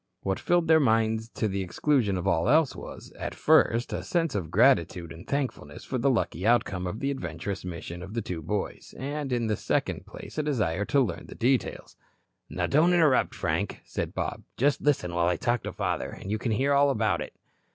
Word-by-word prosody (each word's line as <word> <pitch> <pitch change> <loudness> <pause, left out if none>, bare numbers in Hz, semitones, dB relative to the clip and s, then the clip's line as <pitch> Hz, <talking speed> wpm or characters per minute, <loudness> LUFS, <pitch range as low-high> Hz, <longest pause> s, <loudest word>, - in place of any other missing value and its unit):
What 95 -1 -1
filled 175 -1 +2
their 160 0 +6
minds 110 -3 +2
to 110 - 0
the 100 -1 -2
exclusion 105 +1 +1
of 90 - -4
all 85 +2 +2
else 155 0 +4
was, - - -9
at - - -4
first, 115 +2 +3
a - - -2
sense 165 -3 0
of 90 -7 -3
gratitude 85 -2 +3
and 80 +3 -11
thankfulness 130 - -3
for 130 - -3
the 140 +4 +3
lucky 90 - 0
outcome 100 -5 +2
of 105 +5 -5
the 140 - 0
adventurous 90 - -4
mission 85 -1 -6
of 95 +5 -8
the 115 - 0
two 85 -4 -4
boys, 95 +6 -4
and, 140 +1 -4
in 120 -2 +1
the 110 -1 +1
second - - -2
place, - - -8
a - - +3
desire 105 - 0
to 140 - +2
learn 125 - -2
the - - -10
details. 125 +1 -1 0.5
"Now - - -1
don't 165 +5 +4
interrupt, 155 -6 +3
Frank," - - -2
said - - -4
Bob. - - -3 0.2
"Just 140 +3 +2
listen 130 -12 +1
while 85 0 +2
I 90 -1 +1
talk 120 +5 0
to - - -5
father, - - -2
and 95 - -7
you 110 - 0
can 115 -1 -1
hear 135 +6 +2
all 140 0 +5
about 135 - +1
it." - - -7
115 Hz, 210 wpm, -27 LUFS, 90-140 Hz, 0.5 s, their